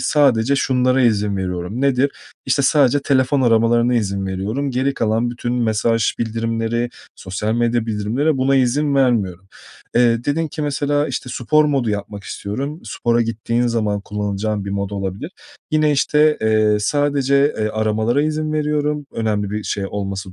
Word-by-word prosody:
sadece 140 -3 +3
şunlara 130 0 +2
izin 105 -4 +1
veriyorum. 90 +4 -4
Nedir? 140 0 +2 0.4
İşte 140 - +2
sadece 140 0 +3
telefon 135 0 +2
aramalarına 120 +1 +3
izin 100 -4 -1
veriyorum. 105 +9 -2
Geri 130 +2 0
kalan 115 +1 0
bütün 120 0 -3
mesaj 115 -1 +1
bildirimleri, 115 +1 -1 0.3
sosyal 105 +4 -3
medya 120 -1 0
bildirimleri, 115 +8 0
buna 135 +1 +2
izin 140 +3 +1
vermiyorum. 100 -9 +1 0.5
Eee, 120 -1 +3
dedin 160 +2 0
ki 150 - -5
mesela, 145 +1 0
işte, 125 - -4
spor 155 +5 +2
modu 135 -6 0
yapmak 100 -1 -5
istiyorum. 135 +10 -5
Spora 120 0 0
gittiğin 115 +2 -1
zaman 105 -3 0
kullanacağın 105 0 -3
bir 100 - -5
mod 100 0 -2
olabilir. 100 - -4 0.4
Yine, 155 -1 +3
işte, 150 +2 +3
eee, 110 -1 +2
sadece, 140 +3 +1 0.2
eee, 110 0 0
aramalara 110 +5 0
izin 155 0 -1
veriyorum 150 -1 -1
önemli 105 -3 -1
bir 105 0 -3
şey 100 -1 -2
olması 95 -2 -5
120 Hz, 150 wpm, -19 LUFS, 105-140 Hz, 0.5 s, sadece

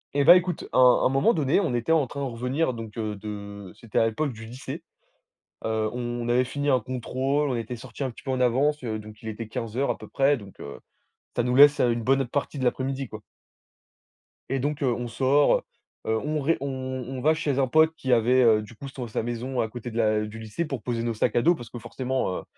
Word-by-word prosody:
Eh, 140 0 +2
bah, 175 - +10
écoute, 180 -2 0
un - - +2 0.3
un - - +7
moment 135 - +3
donné, 150 +3 +2
on 165 -10 -1
était 120 +7 +1
en 155 -4 +3
train 140 - -7
de 140 -1 -2
revenir 125 +5 -1
donc 115 -2 -8
heu, 110 -2 -2
de 100 -2 -8
c'était 115 -3 -5
à - - +5
l'époque 130 +5 -2
du 115 0 -10
lycée. 125 +4 -7 0.8
Heu, 110 -1 0
on 120 -1 -3
avait 120 +1 +3
fini 145 +3 -3
un 130 -3 +3
contrôle. 130 +4 -1
On 130 - 0
était 115 +1 -4
sortis 120 +3 -7
un 130 - -2
petit - - -14
peu 135 - -3
en 130 -1 0
avance, 135 +4 +2
heu, 110 -3 -3
donc 105 0 -12
il 110 - -5
était 110 +1 -6
15:00 120 +3 -2
à - - 0
peu - - -11
près 140 +1 +3
donc 100 -6 -12
heu, - - -8 0.6
ça - - +1
nous 125 +1 0
laisse, 145 +1 +8
heu, 120 - +4
une 115 -1 -1
bonne 135 +2 +3
partie 145 +2 -3
de - - -1
l'après-midi, 130 +1 -1
quoi. 110 -1 -9 1.3
Et 135 - 0
donc 145 +3 -2
heu, 125 -3 +2
on 120 +1 -4
sort, 130 +5 +3 0.4
heu, 110 - +1
on 150 +1 -1
re 145 +4 +2
on 140 - -2 0.4
on 130 -1 -5
va 155 +4 +4
chez 145 -4 -1
un 135 - +3
pote 155 +4 +4
qui 130 -5 -3
avait, 125 +2 +4
heu, 110 -2 +5
du 105 +2 -12
coup, 140 - -8
son 130 -2 -6
sa 110 - -2
maison 120 +2 -2
à 110 - 0
côté 120 +1 -7
de 115 - -6
la 110 -1 +2
du 105 +1 -8
lycée 110 +10 -4
pour 135 -6 -5
poser 115 -2 -2
nos 115 -1 -1
sacs 110 - 0
à 120 - +4
dos 175 +7 +4
parce 120 -6 -10
que, 120 - -8
forcément, 130 -4 -2
heu, - - -10
125 Hz, 245 wpm, -26 LUFS, 115-140 Hz, 1.3 s, bah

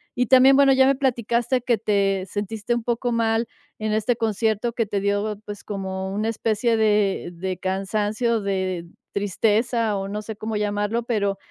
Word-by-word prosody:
Y 250 -1 +1
también 265 +1 +7
bueno, 275 -1 +6
ya 265 0 +5
me 275 - +4
platicaste 245 -1 0
que 240 -2 +1
te 195 -2 +1
sentiste 210 +3 -3
un 235 - -3
poco 240 0 -1
mal 225 0 +1 0.3
en 215 0 -2
este 220 +3 +1
concierto 220 +1 0
que 230 -2 0
te 200 0 -2
dio, 205 +1 -1
pues, 205 -1 -8
como 190 -1 -4
una 215 +2 -1
especie 225 +1 0
de 210 -4 +1
de 185 +2 -4
cansancio, 210 +4 -1
de 190 -3 -2 0.3
tristeza, 215 +2 +1
o 195 0 -3
no 210 +1 -4
sé 215 0 -7
cómo 220 0 -4
llamarlo, 210 +2 -1
pero, 200 -4 -1
215 Hz, 170 wpm, -23 LUFS, 200-235 Hz, 0.3 s, también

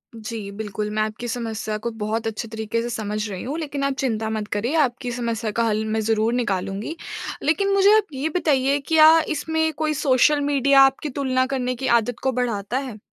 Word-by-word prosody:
जी, 220 -2 -6
बिल्कुल 210 0 -4
मैं 215 0 0
आपकी 215 +3 -5
समस्या 225 -2 -3
को 225 +3 -4
बहुत 225 +2 -2
अच्छे 225 +1 -4
तरीके 220 +1 -3
से 240 - -4
समझ 215 -2 -3
रही 190 -2 -6
हूँ 280 +5 -4
लेकिन 285 -3 -4
आप 275 0 +1
चिंता 225 -5 -1
मत 215 -1 -3
करिए, 235 +9 -1
आपकी 250 -5 0
समस्या 230 -2 -2
का 230 +2 0
हल 215 -1 0
मैं 220 0 -1
ज़रूर 220 +1 +1
निकालूँगी। 205 - -2 0.5
लेकिन 395 +6 +2
मुझे 395 +2 +6
आप 425 -2 0
ये 275 +4 -2
बताइए 280 -4 +2
क्या 320 0 +7 0.2
इसमें 320 +1 0
कोई 305 0 +1
सोशल 290 0 +3
मीडिया 280 -1 +4
आपकी 270 +3 +3
तुलना 255 -2 +1
करने 255 -1 -1
की 265 +2 -3
आदत 240 +2 -6
को 265 - +2
बढ़ाता 240 -3 -2
है? 260 -6 -5
240 Hz, 195 wpm, -23 LUFS, 220-280 Hz, 0.5 s, क्या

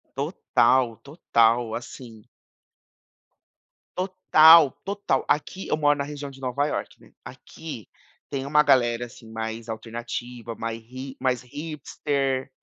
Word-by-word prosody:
Total, 120 0 +1
total, 115 -6 +1
assim 115 -2 -9 1.7
Total, 165 -5 +6
total. 200 -9 -1
Aqui 185 +5 -1
eu - - +1
moro 145 -1 +3
na 140 - -1
região 145 0 -7
de 135 - -15
Nova 135 +2 -1
Iorque, - - -5
né. - - -19
Aqui 155 - -9 0.4
tem 135 -1 -3
uma 150 +2 +4
galera 120 -3 +3
assim 115 -1 -14
mais 110 +1 -5
alternativa, 120 +1 -6
mais 115 0 -5
hi 130 +1 -8
mais 125 -2 0
hipster. 140 -1 -3
130 Hz, 120 wpm, -25 LUFS, 115-145 Hz, 1.7 s, Total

